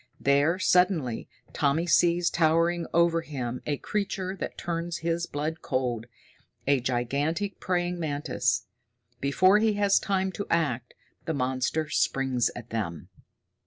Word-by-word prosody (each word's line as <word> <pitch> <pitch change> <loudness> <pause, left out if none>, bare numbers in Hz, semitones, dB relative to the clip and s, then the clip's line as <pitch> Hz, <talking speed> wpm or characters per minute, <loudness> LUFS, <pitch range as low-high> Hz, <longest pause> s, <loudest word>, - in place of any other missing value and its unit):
There, 140 +5 +3
suddenly, 180 - +2 0.2
Tommy 150 +3 +1
sees 175 +1 +3
towering 165 +1 +2
over 170 0 +3
him 125 -6 -5
a 145 -1 0
creature 195 -1 -3
that - - -5
turns 170 0 -3
his 170 +1 0
blood 155 +3 -3
cold 125 -3 -2 0.6
a 140 -1 +3
gigantic 140 - -1
praying 175 -1 -1
mantis. 145 -3 -1 0.5
Before 185 +9 +4
he 220 0 +3
has 205 -1 +3
time 190 -1 0
to 200 +2 -5
act, 130 -8 0 0.3
the 160 - -1
monster 130 +4 -1
springs 130 -5 +1
at 120 -1 -9
them! 100 -7 -4
160 Hz, 125 wpm, -27 LUFS, 130-175 Hz, 0.6 s, Before